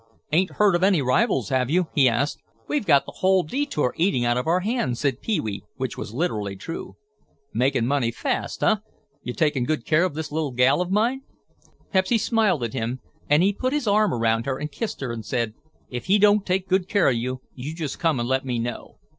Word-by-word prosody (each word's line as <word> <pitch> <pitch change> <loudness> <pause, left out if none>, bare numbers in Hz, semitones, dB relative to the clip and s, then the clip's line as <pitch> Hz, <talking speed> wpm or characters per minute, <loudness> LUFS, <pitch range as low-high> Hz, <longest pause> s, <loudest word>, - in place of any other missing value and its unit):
"Ain't 180 +5 +2
heard 205 -2 +3
of 175 - +1
any 190 -3 +4
rivals, 135 - +1
have 130 -1 +1
you?" 180 +4 +2
he 135 -3 +5
asked. 140 +5 -1 0.3
"We've 290 -9 -1
got 140 - +5
the - - -8
whole 190 -1 +3
detour 155 - -1
eating 160 -9 +1
out 120 0 +2
of 125 +3 -2
our 175 +3 +2
hands," 185 - -1
said 140 -3 -1
Pee 220 - 0
wee, 100 -3 -4
which 130 -2 -3
was - - -6
literally 110 - -2
true. 165 - -7 0.6
"Makin' 125 0 +1
money 130 -2 +1
fast, 115 - -3
huh? - - +4 0.4
You 125 - -5
takin' 150 -4 +1
good 155 +4 -2
care 155 +2 +3
of 185 -6 -1
this 155 -1 -4
little 150 -3 -2
gal 130 +6 +3
of 180 - -2
mine?" 230 +7 +1 0.7
Pepsy 190 +5 +3
smiled 215 - +1
at 115 - -3
him 120 +3 -3 0.3
and 150 +4 +5
he 200 +2 +3
put 255 +6 -2
his 295 -3 0
arm 210 0 +3
around 115 0 0
her 130 -1 -1
and 150 +1 -5
kissed 215 +6 -4
her 130 -3 -2
and 115 -1 -5
said, 115 -1 -2 0.4
"If 125 -1 -5
he 195 +3 +4
don't 205 0 +4
take 185 0 0
good 190 0 +1
care 205 -4 +3
of 130 - +3
you, 125 +2 -3
you 140 +5 -6
just 155 -5 -4
come 165 -6 +1
and 120 - -1
let 130 +1 +1
me 125 -2 -2
know." 120 +1 -5
150 Hz, 220 wpm, -24 LUFS, 125-190 Hz, 0.7 s, he